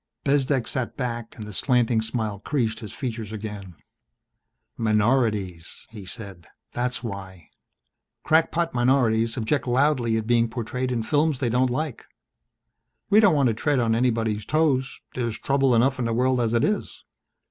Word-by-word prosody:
Bezdek 135 -3 +1
sat 130 -2 -3
back 120 -3 -4
and 110 - -7
the 105 - -8
slanting 120 0 +2
smile 110 -3 -3
creased 110 -2 -1
his 110 - -8
features 115 -5 -5
again. 105 -4 -7 1.0
"Minorities," 105 -6 0
he 105 -4 -9
said. 95 -4 -7 0.3
"That's 125 0 -2
why. 95 -6 -7 0.7
Crackpot 165 +1 +2
minorities 120 -2 +2
object 130 +4 0
loudly 125 -3 +2
at 110 - -2
being 115 0 +2
portrayed 125 +2 -3
in 115 -2 -1
films 150 +3 +1
they 125 -2 -1
don't 125 +2 +2
like. 135 +1 -3 1.0
We 210 - +7
don't 200 -7 +5
want 140 -4 +3
to - - +1
tread 145 +6 0
on 115 -2 +2
anybody's 115 -3 0
toes 145 -3 0
there's 120 -3 -2
trouble 135 -2 +2
enough 130 +3 +2
in 120 - 0
the 115 - 0
world 125 +1 +2
as 115 0 0
it 115 - +2
is. 210 0 -2
120 Hz, 155 wpm, -24 LUFS, 110-130 Hz, 1.0 s, We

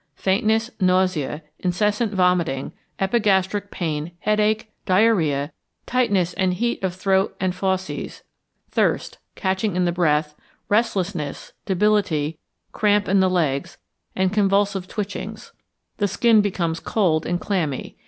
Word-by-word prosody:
Faintness, 220 +4 +1
nausea, 185 -5 +1 0.2
incessant 210 +4 0
vomiting, 180 -8 +1 0.3
epigastric 200 -1 +1
pain, 160 -2 -3
headache, 215 +1 +1 0.2
diarrhoea, 175 -8 +2 0.3
tightness 200 -8 +1
and 185 -2 0
heat 235 +1 -1
of 185 -2 -1
throat 190 +1 +1
and 185 -1 0
fauces, 190 0 -3 0.5
thirst, - - 0 0.2
catching 190 0 -1
in 180 0 +2
the 175 - +2
breath, 155 -3 +1 0.4
restlessness, 195 -8 -1
debility, 185 -6 +1 0.3
cramp 205 -1 +2
in 195 +1 +3
the 190 0 +4
legs, 150 -7 -1 0.4
and 190 0 +1
convulsive 200 -2 +1
twitchings. 205 -1 -6 0.5
The 205 - +1
skin 220 +3 +4
becomes 170 -5 -1
cold 165 -7 +1
and 175 +1 0
clammy. 165 -11 -2
190 Hz, 115 wpm, -22 LUFS, 175-205 Hz, 0.5 s, the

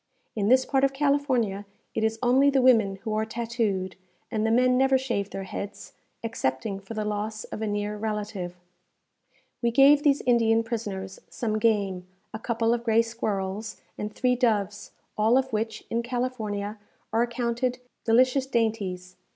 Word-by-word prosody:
In 205 -2 0
this 260 +2 +5
part 270 -1 +1
of 275 0 +3
California 270 -8 +1 0.3
it 220 - -1
is 220 0 +1
only 260 +3 +5
the 270 -2 +2
women 220 -6 +5
who 220 -2 -2
are 215 0 +1
tattooed, 220 -5 -2 0.3
and 215 -2 0
the 225 - +2
men 250 +2 +4
never 265 +1 +4
shave 235 -7 -2
their 195 - -5
heads, 200 +1 -7 0.3
excepting 195 -3 -2
for 195 +3 -9
the 215 -1 -2
loss 210 +1 -3
of - - -7
a 220 - -1
near 205 0 -2
relative. 210 -4 -4 1.1
We 235 - +2
gave 275 +4 +6
these 290 -2 +3
Indian 230 -2 +3
prisoners 205 -5 -5
some 215 -2 -2
game, 200 -5 +1 0.3
a 220 - -5
couple 230 0 +1
of 235 -1 -2
gray 230 -1 +4
squirrels, 210 -2 -3 0.2
and 210 0 -4
three 250 +3 +1
doves, 210 -5 0 0.3
all 220 +4 +4
of 265 -2 -1
which, 220 0 -2
in 230 - +1
California, 225 -4 -3 0.3
are 225 - +3
accounted 240 +1 -1 0.3
delicious 255 +3 +3
dainties. 200 -7 -2
225 Hz, 160 wpm, -26 LUFS, 205-245 Hz, 1.1 s, gave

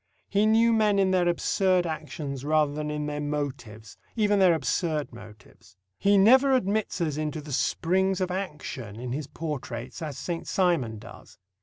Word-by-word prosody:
He 205 +1 +2
knew 230 +1 +4
men 210 -2 +3
in 190 -1 +3
their 180 -2 +2
absurd 185 +1 +1
actions 150 -4 -5
rather 150 -1 +2
than 150 0 -4
in 150 0 -3
their 150 0 -3
motives 130 -8 -5 0.2
even 210 -3 +2
their 180 -3 +5
absurd 155 -1 -1
motives. 105 -4 -15 0.2
He 200 0 +4
never 260 +7 +6
admits 210 -5 0
us 155 -3 -1
into 155 0 -3
the 150 -1 -8
springs 190 +7 +1
of 185 -1 -1
action 150 - -5
in 125 0 -5
his 140 +2 -4
portraits 135 -4 -6
as 150 -4 -5
Saint 170 -2 -4
Simon 165 - +1
does. - - -13
155 Hz, 165 wpm, -26 LUFS, 145-190 Hz, 0.2 s, never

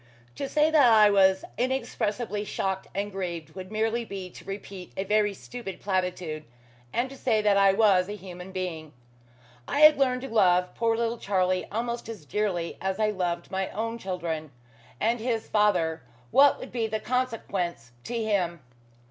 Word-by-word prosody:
To 275 - -4
say 305 +1 +3
that 285 -7 +6
I 215 -2 +7
was 190 -1 +4
inexpressibly 235 -4 -1
shocked 190 -2 -2
and 200 +1 -2
grieved 175 -4 -5
would 185 +1 -9
merely 225 +2 0
be 190 -4 -7
to - - -12
repeat 195 -2 -8
a 190 - 0
very 210 +1 +2
stupid 215 -3 -8
platitude, 180 -5 -2 0.5
and 240 +2 0
to - - -9
say 235 -5 +1
that 205 -1 +4
I 195 -1 +5
was 195 -3 +4
a 205 - -4
human 180 -1 -9
being. 170 -5 -5 0.7
I 285 - 0
had 305 -1 +8
learned 255 -2 +2
to - - -4
love 180 -6 +3
poor 230 -1 +1
little 235 0 -1
Charlie 185 -2 0
almost 235 +2 -3
as 210 -9 -8
dearly 180 -3 -2
as 190 0 -1
I 215 -1 +2
loved 175 -3 -3
my 190 0 -1
own 230 +2 -3
children. 170 -6 -4 0.5
And 230 +6 +1
his 225 -1 -2
father 180 -8 +2 0.3
what 280 0 +6
would 260 - -8
be 230 -2 -1
the 220 0 -2
consequence 200 - -2
to 240 - -4
him? 190 -7 0
205 Hz, 170 wpm, -27 LUFS, 185-230 Hz, 0.7 s, had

